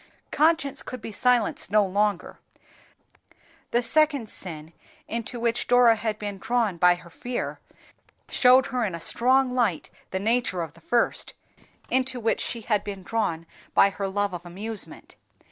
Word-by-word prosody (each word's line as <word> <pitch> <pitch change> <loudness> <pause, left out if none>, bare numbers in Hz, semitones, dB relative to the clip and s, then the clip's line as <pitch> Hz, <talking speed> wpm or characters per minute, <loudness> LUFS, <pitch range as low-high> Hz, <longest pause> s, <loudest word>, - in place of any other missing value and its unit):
Conscience 310 -3 +2
could 255 - -7
be 225 - -7
silenced 245 -2 +2
no 210 0 +4
longer; 200 0 -1 1.3
the 240 +1 +1
second 285 -3 +2
sin 160 -3 -4 0.3
into 230 +1 -4
which 235 0 0
Dora 245 -2 +6
had 220 -1 -3
been 205 -2 -6
drawn 225 -5 0
by 180 +1 +5
her 175 -1 -14
fear 245 +11 -4 0.7
showed 255 +1 +5
her 250 -1 +1
in 190 -6 -2
a - - -6
strong 255 +8 +2
light 230 -10 0 0.2
the 190 - -3
nature 215 -3 0
of 160 - -8
the 170 - -19
first, 235 +8 0 0.6
into 260 -1 +1
which 225 -1 0
she 235 - -3
had 210 -2 0
been 195 -2 -7
drawn 180 -6 -2 0.3
by 200 - +6
her 195 0 -3
love 200 0 -1
of 175 -1 -6
amusement. 205 +5 -7
220 Hz, 155 wpm, -25 LUFS, 190-245 Hz, 1.3 s, Dora